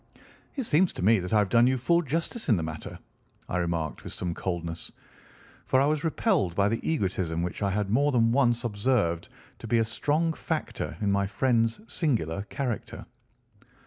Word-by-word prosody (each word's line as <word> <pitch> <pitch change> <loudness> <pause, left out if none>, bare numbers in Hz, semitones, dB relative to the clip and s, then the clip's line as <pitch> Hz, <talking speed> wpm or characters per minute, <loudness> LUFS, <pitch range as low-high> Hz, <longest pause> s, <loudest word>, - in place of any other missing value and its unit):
"It 270 - -2
seems 180 -3 +3
to - - -5
me 110 0 +5
that 90 +2 -5
I 110 - +4
have 105 -2 +2
done 120 +4 +5
you 130 0 +2
full 170 +8 +2
justice 165 - -3
in 110 - +5
the 80 - -2
matter," 80 0 -6 0.5
I 90 - -2
remarked 85 -3 -2
with - - -7
some 90 -2 -3
coldness, 85 -2 -4 0.8
for 130 - +4
I 135 - +4
was 150 0 0
repelled 160 - +1
by 100 0 +3
the 115 - -1
egotism 95 - -1
which 90 - -4
I 100 - +1
had 100 0 -1
more 140 +6 +3
than 115 -3 +3
once 120 -2 +2
observed 105 -6 0 0.3
to 115 - -8
be 120 +1 +2
a 115 - +4
strong 150 +8 0
factor - - -4
in 100 -1 +1
my 100 0 +1
friend's 115 - +1
singular 105 - -1
character. 125 -5 -4
115 Hz, 185 wpm, -27 LUFS, 95-140 Hz, 0.8 s, me